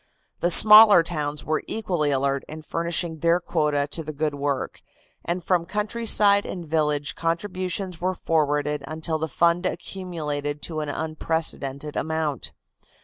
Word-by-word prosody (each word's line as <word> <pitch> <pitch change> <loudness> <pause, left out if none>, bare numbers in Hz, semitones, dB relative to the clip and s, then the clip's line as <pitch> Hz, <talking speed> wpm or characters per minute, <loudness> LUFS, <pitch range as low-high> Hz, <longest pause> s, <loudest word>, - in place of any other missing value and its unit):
The 175 - +1
smaller 210 0 +8
towns 150 -3 -3
were 155 0 0
equally 175 -9 -1
alert 140 0 0
in 155 0 -9
furnishing 170 0 -2
their 170 +2 +3
quota 150 -4 0
to 165 - -3
the 155 - -6
good 155 0 -2
work, 140 -1 -3 0.4
and 175 +1 -3
from 175 -2 0
countryside 210 -1 +2
and 175 -2 -6
village 150 -2 0
contributions 180 +1 -3
were 185 +1 -1
forwarded 150 -3 0
until 160 +1 -3
the 160 - -2
fund 170 +3 +1
accumulated 160 -5 -4
to 160 -2 -3
an 150 -1 -3
unprecedented 155 -2 -2
amount. 155 - -2
160 Hz, 140 wpm, -24 LUFS, 150-175 Hz, 0.4 s, smaller